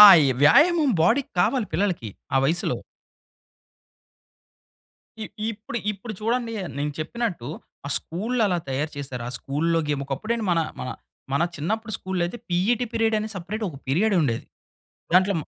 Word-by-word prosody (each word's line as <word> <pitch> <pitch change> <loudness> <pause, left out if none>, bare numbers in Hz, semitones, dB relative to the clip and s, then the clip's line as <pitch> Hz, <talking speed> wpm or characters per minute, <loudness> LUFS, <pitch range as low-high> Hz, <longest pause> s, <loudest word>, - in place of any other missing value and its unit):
ఆ! - - +14 0.2
ఈ - - +3
వ్యాయామం 300 - +6
బాడీకి 250 +8 +2
కావాలి 250 -6 +2
పిల్లలకి 170 - 0 0.2
ఆ - - +5
వయసులో. 170 +5 +1 2.5
ఇ - - -2 0.3
ఇప్పుడు 225 +2 -5
ఇప్పుడు 215 +3 -7
చూడండి, 230 +1 0 0.2
నేను 145 +1 -1
చెప్పినట్టు 175 - -3 0.4
ఆ - - -3
స్కూళ్లు 225 +9 -2
అలా 180 -2 +1
తయారు 145 +4 -1
చేశారు. 135 -4 -5
ఆ - - -4
స్కూలులో 165 +4 0
గేమ్ 145 -2 0
ఒకప్పుడేంటి 215 - -2
మన 165 - +3 0.2
మన 125 - -4 0.4
మన 140 +4 +3
చిన్నప్పుడు 220 +9 -2
స్కూలులైయితే 185 +3 -2
పిఈటి 210 +8 +2
పీరియడ్ 225 -1 +2
అనే 215 - -3
సెపరేట్ 200 +5 -4
ఒక 145 - -8
పీరియడ్ 195 +11 +2
ఉండేది. 120 -6 0 0.7
దాంట్లో 185 +2 +5
190 Hz, 140 wpm, -25 LUFS, 150-225 Hz, 2.5 s, ఆ